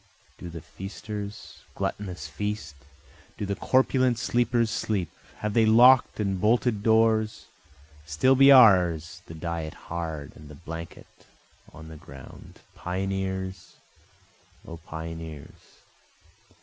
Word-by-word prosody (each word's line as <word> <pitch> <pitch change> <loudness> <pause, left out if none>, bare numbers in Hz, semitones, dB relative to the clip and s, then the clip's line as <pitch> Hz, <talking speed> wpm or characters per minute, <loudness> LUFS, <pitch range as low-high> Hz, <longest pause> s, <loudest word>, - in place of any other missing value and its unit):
Do 90 - -8
the 85 -1 -8
feasters 100 +3 -8 0.2
gluttonous 90 -6 -4
feast? 105 -1 -5 0.6
Do 105 - -3
the 100 - -2
corpulent 130 +2 +2
sleepers 120 -1 0
sleep? 95 -7 -2 0.3
have 105 -1 -2
they 110 -1 +3
lock'd 125 +3 +6
and 95 -3 -1
bolted 110 -1 +2
doors? 110 0 +2 0.6
Still 80 - +2
be 135 +1 +7
ours 90 - +5
the 80 - -9
diet 80 -1 -5
hard, 80 -3 -6
and 75 -1 -14
the 75 - -11
blanket 80 +2 -10 0.4
on 80 -1 -12
the 80 - -10
ground, 70 -5 -14
Pioneers! 95 0 -4 0.9
O 85 - -8
pioneers! 80 -2 -10
95 Hz, 110 wpm, -26 LUFS, 80-110 Hz, 0.9 s, be